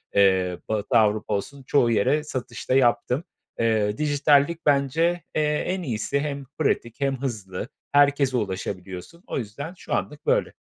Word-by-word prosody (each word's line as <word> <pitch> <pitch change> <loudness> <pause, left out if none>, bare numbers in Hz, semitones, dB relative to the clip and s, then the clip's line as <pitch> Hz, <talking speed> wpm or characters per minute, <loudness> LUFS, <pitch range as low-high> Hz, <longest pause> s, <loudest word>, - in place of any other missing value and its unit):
eee, 95 -3 +3
Batı 105 0 +1
Avrupa 105 -1 +2
olsun, 135 +7 -4
çoğu 125 -3 +3
yere 135 +8 +2
satış 130 -5 -6
da 130 - +4
yaptım. 125 +3 +2 0.4
Eee, 110 -2 +1
dijitallik 145 +2 +2
bence, 155 +5 +2
eee, 155 - +2 0.3
en 185 0 -1
iyisi 125 0 -1
hem 140 -1 -3
pratik 135 -4 -1
hem 135 -1 0
hızlı, 105 -5 -4 0.2
herkese 140 -2 +4
ulaşabiliyorsun. 95 - -5
O - - -3
yüzden 135 - -5
şu - - -6
anlık 150 0 -3
böyle. - - +2
130 Hz, 145 wpm, -24 LUFS, 105-145 Hz, 0.4 s, da